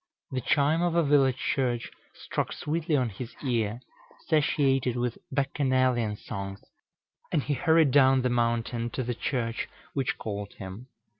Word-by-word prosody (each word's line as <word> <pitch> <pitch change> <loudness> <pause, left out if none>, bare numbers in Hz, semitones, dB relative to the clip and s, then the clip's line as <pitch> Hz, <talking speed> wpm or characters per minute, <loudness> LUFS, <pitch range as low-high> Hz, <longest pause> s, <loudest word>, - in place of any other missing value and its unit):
The 130 -1 -2
chime 150 +5 +2
of 175 -1 +1
a 170 - +4
village 140 -3 +4
church 120 -3 -1 0.2
struck - - -3
sweetly 155 0 -1
on 125 -4 +2
his 115 +4 -8
ear, 115 -3 0 0.4
satiated 135 -5 +2
with 120 -1 -2
Bacchanalian 130 -5 +1
songs; 100 -2 -6 0.7
and 145 - +1
he 145 - 0
hurried 160 +1 +4
down 130 -1 +5
the 125 - +2
mountain 120 0 0
to 130 - -1
the 120 +1 -2
church 115 -1 -2 0.2
which 135 -2 -1
called 100 -2 -5
him. 95 +6 -9
130 Hz, 145 wpm, -28 LUFS, 115-140 Hz, 0.7 s, down